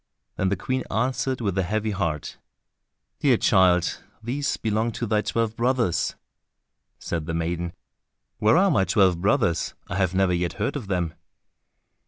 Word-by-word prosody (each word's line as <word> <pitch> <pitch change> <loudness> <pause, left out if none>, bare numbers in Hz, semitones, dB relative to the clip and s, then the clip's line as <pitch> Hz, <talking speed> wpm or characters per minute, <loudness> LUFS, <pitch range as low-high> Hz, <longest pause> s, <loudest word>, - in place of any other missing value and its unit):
Then 95 - 0
the 100 - +1
Queen 130 +8 -2
answered 130 +2 -1
with 100 -5 -1
a - - +4
heavy 110 +4 -1
heart, 85 -7 -3 0.8
"Dear - - +4
child, 90 -2 +3 0.2
these 140 +5 -1
belong 110 +1 0
to 120 - -3
thy 105 -1 +1
twelve 115 0 -1
brothers." 120 -6 +1 0.8
Said 80 -2 -4
the 80 - -2
maiden, 85 +1 -2 0.7
"Where 110 +9 +4
are 195 +1 +4
my 105 -10 +3
twelve 95 -2 +3
brothers, 100 - +1
I 90 - -2
have 95 -2 +1
never 95 -1 +3
yet 85 0 -1
heard 110 +8 -2
of 125 -8 -5
them?" 90 -4 -1
100 Hz, 155 wpm, -25 LUFS, 90-115 Hz, 0.8 s, a